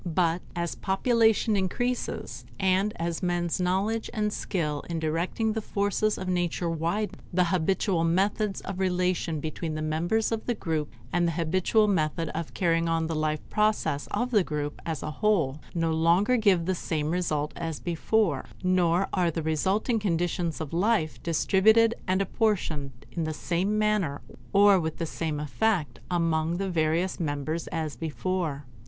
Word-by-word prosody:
But 170 Hz, 0 st, +1 dB
as 170 Hz, -1 st, -2 dB
population 220 Hz, +2 st, +2 dB
increases, 245 Hz, +6 st, -2 dB, 0.2 s
and 190 Hz, +2 st, +2 dB
as 170 Hz, 0 st, -3 dB
men's 175 Hz, 0 st, 0 dB
knowledge 195 Hz, +5 st, 0 dB
and 210 Hz, -1 st, 0 dB
skill 150 Hz, -6 st, -2 dB
in 170 Hz, -, -2 dB
directing 170 Hz, +8 st, -1 dB
the 220 Hz, -, -2 dB
forces 205 Hz, +1 st, 0 dB
of 185 Hz, -, -5 dB
nature 175 Hz, -1 st, 0 dB
widen, 170 Hz, +5 st, -2 dB
the 180 Hz, +1 st, +3 dB
habitual 185 Hz, 0 st, +1 dB
methods 195 Hz, +4 st, +1 dB
of 195 Hz, -1 st, -6 dB
relation 180 Hz, -3 st, 0 dB
between 155 Hz, +1 st, -4 dB
the 155 Hz, -, -3 dB
members 170 Hz, +9 st, 0 dB
of 225 Hz, -1 st, -3 dB
the 240 Hz, -, +1 dB
group, 160 Hz, -6 st, -2 dB, 0.2 s
and 175 Hz, 0 st, +2 dB
the 165 Hz, -, 0 dB
habitual 185 Hz, +6 st, +2 dB
method 165 Hz, -4 st, 0 dB
of 165 Hz, 0 st, -5 dB
carrying 165 Hz, -2 st, +2 dB
on 165 Hz, 0 st, +1 dB
the 165 Hz, -, -2 dB
life 155 Hz, -1 st, -1 dB
process 210 Hz, -9 st, +1 dB
of 250 Hz, +1 st, -2 dB
the 210 Hz, -5 st, +4 dB
group 150 Hz, -2 st, -4 dB
as 160 Hz, -4 st, -3 dB
a 155 Hz, -, -3 dB
whole, 160 Hz, -6 st, +1 dB, 0.2 s
no 165 Hz, -1 st, +1 dB
longer 170 Hz, +9 st, +3 dB
give 200 Hz, -7 st, +3 dB
the 190 Hz, -, +1 dB
same 155 Hz, -3 st, -2 dB
result 155 Hz, -4 st, -1 dB
as 165 Hz, -3 st, -4 dB
before; 185 Hz, +4 st, 0 dB, 0.2 s
nor 185 Hz, 0 st, +3 dB
are 180 Hz, -3 st, +2 dB
the 165 Hz, 0 st, -3 dB
resulting 190 Hz, -, +1 dB
conditions 175 Hz, -3 st, -1 dB
of 160 Hz, -2 st, -5 dB
life 180 Hz, -3 st, +1 dB
distributed 220 Hz, +7 st, +4 dB
and 190 Hz, +1 st, +2 dB
apportioned 185 Hz, -, 0 dB, 0.2 s
in 170 Hz, -, -2 dB
the 155 Hz, -, -2 dB
same 185 Hz, +7 st, 0 dB
manner 210 Hz, -9 st, +1 dB, 0.3 s
or 200 Hz, -1 st, +6 dB
with 160 Hz, -2 st, -3 dB
the 165 Hz, -, -2 dB
same 155 Hz, -2 st, -3 dB
effect 150 Hz, -, 0 dB
among 165 Hz, -1 st, +1 dB
the 195 Hz, 0 st, -2 dB
various 165 Hz, +2 st, 0 dB
members 155 Hz, +1 st, -2 dB
as 160 Hz, -3 st, -3 dB
before. 160 Hz, -2 st, -3 dB
175 Hz, 160 wpm, -27 LUFS, 160-200 Hz, 0.3 s, or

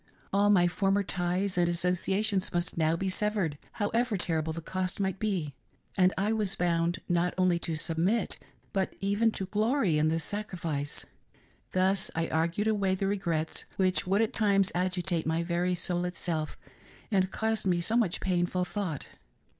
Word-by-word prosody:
All 200 Hz, +1 st, +4 dB
my 180 Hz, -4 st, +5 dB
former 195 Hz, +3 st, +1 dB
ties 180 Hz, +1 st, -1 dB
and 175 Hz, -1 st, +3 dB
associations 185 Hz, +3 st, +1 dB
must 175 Hz, -1 st, -1 dB
now 160 Hz, 0 st, +2 dB
be 190 Hz, +3 st, -2 dB
severed, 190 Hz, -6 st, -1 dB
however 225 Hz, +1 st, 0 dB
terrible 160 Hz, -3 st, -1 dB
the 165 Hz, -, -5 dB
cost 185 Hz, +3 st, -3 dB
might 190 Hz, -1 st, -1 dB
be; 185 Hz, -9 st, -1 dB, 0.4 s
and 185 Hz, -1 st, +4 dB
I 205 Hz, +3 st, +1 dB
was 210 Hz, -3 st, +2 dB
bound 170 Hz, 0 st, 0 dB
not 175 Hz, 0 st, +1 dB
oply 180 Hz, -2 st, +3 dB
to 165 Hz, -, -2 dB
submit, 170 Hz, +7 st, 0 dB, 0.3 s
but 190 Hz, -1 st, -1 dB
even 205 Hz, +4 st, +2 dB
to 190 Hz, -, -3 dB
glory 210 Hz, -, +1 dB
in 155 Hz, -, +3 dB
the 160 Hz, +1 st, +1 dB
sacrifice. 165 Hz, -5 st, -3 dB, 0.7 s
Thus 190 Hz, +1 st, +2 dB
I 165 Hz, 0 st, 0 dB
argued 170 Hz, +6 st, 0 dB
away 200 Hz, -3 st, +2 dB
the 195 Hz, -, -2 dB
regrets 170 Hz, -5 st, -1 dB
which 185 Hz, 0 st, +1 dB
would 200 Hz, +4 st, +3 dB
at 220 Hz, -, -2 dB
times 200 Hz, -3 st, +3 dB
agitate 180 Hz, -1 st, -1 dB
my 165 Hz, +1 st, +1 dB
very 175 Hz, +1 st, 0 dB
soul 175 Hz, 0 st, 0 dB
itself, 170 Hz, -3 st, -2 dB, 0.5 s
and 190 Hz, -2 st, +2 dB
caused 220 Hz, -1 st, -1 dB
me 175 Hz, -2 st, +2 dB
so 220 Hz, +7 st, +3 dB
much 220 Hz, -8 st, +1 dB
painful 180 Hz, 0 st, 0 dB
thought. 180 Hz, -7 st, -4 dB
185 Hz, 160 wpm, -29 LUFS, 170-200 Hz, 0.7 s, my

